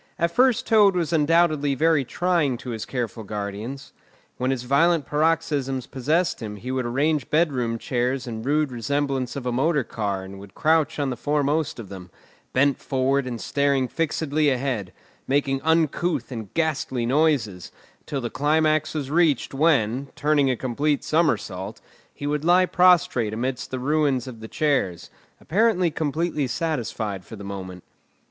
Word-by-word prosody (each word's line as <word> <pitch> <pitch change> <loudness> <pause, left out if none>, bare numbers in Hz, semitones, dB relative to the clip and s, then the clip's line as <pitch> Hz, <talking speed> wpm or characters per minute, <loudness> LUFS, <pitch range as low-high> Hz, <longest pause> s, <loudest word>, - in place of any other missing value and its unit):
At 170 0 +1
first 245 +2 +3
Toad 205 -4 +5
was 170 -2 -1
undoubtedly 155 -2 +3
very 160 0 +3
trying 165 -2 0
to 125 - -7
his 110 -2 -4
careful 120 -3 -4
guardians. 105 +6 -6 0.4
When 125 +1 -1
his 130 -2 -1
violent 155 +5 +3
paroxysms 150 -4 0
possessed 155 +7 0
him 105 -2 -5
he 120 +6 -6
would 130 -2 -1
arrange 145 +5 0
bedroom 130 -8 +1
chairs 125 +2 -1
in 115 -3 -5
rude 145 +3 +1
resemblance 135 +1 -2
of 135 -2 -5
a 125 - 0
motor 140 +3 +1
car 100 -4 -3
and 95 +1 -10
would 100 0 -13
crouch 160 -1 +2
on 140 -3 -1
the - - -3
foremost 145 +3 0
of 110 -5 -8
them, 95 -2 -9 0.4
bent 140 0 +2
forward 135 0 0
and 120 -2 -4
staring 140 -1 +1
fixedly 155 0 0
ahead, 125 -7 -2 0.4
making 135 -1 +1
uncouth 160 0 +1
and 110 -5 -6
ghastly 155 -6 -1
noises, 125 - +1 0.4
till 140 -2 -3
the 120 - -4
climax 155 +2 +1
was 140 -3 -3
reached, 155 -7 +2
when, 135 -4 +2
turning 145 -2 +2
a 130 - +1
complete 140 +5 -1
somersault, 115 - -1 0.3
he 145 - -8
would 145 0 -1
lie 180 +2 +5
prostrate 180 -12 +3
amidst 125 +2 -3
the 130 - -3
ruins 140 -1 +1
of 125 -4 -9
the 110 - -8
chairs, 135 - -1 0.3
apparently 185 -3 +2
completely 155 -1 -1
satisfied 115 - -3
for 100 - -10
the 100 - -10
moment. 95 -2 -7
140 Hz, 155 wpm, -24 LUFS, 120-155 Hz, 0.4 s, Toad